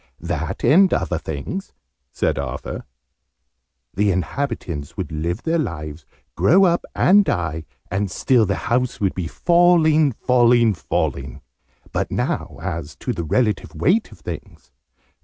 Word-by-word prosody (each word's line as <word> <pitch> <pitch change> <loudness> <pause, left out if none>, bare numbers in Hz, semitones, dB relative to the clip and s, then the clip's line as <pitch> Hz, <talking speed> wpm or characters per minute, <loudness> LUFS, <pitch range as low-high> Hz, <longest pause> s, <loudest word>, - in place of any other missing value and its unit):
"That, 85 +2 -4
and 185 +5 +5
other 90 - 0
things," 80 - -5 0.4
said - - -1
Arthur. - - -5 1.1
"The 100 +2 +1
inhabitants 90 - -3
would - - -4
live 85 +7 -3
their 165 +1 +1
lives, 75 - -5 0.3
grow 190 +6 +5
up 175 -2 +3
and 205 +3 +5
die, 80 - -2 0.3
and 100 +1 -1
still 115 +3 +2
the 100 - 0
house 125 +1 0
would 95 -3 +1
be 90 -3 -3
falling, 165 - +4
falling, 120 -2 +3
falling! 70 -4 -3 0.5
But - - -1
now - - -2
as 85 -5 -4
to - - -3
the 85 - -4
relative 105 +7 0
weight 215 +5 +1
of - - -15
things. - - -8
100 Hz, 135 wpm, -21 LUFS, -, 1.1 s, and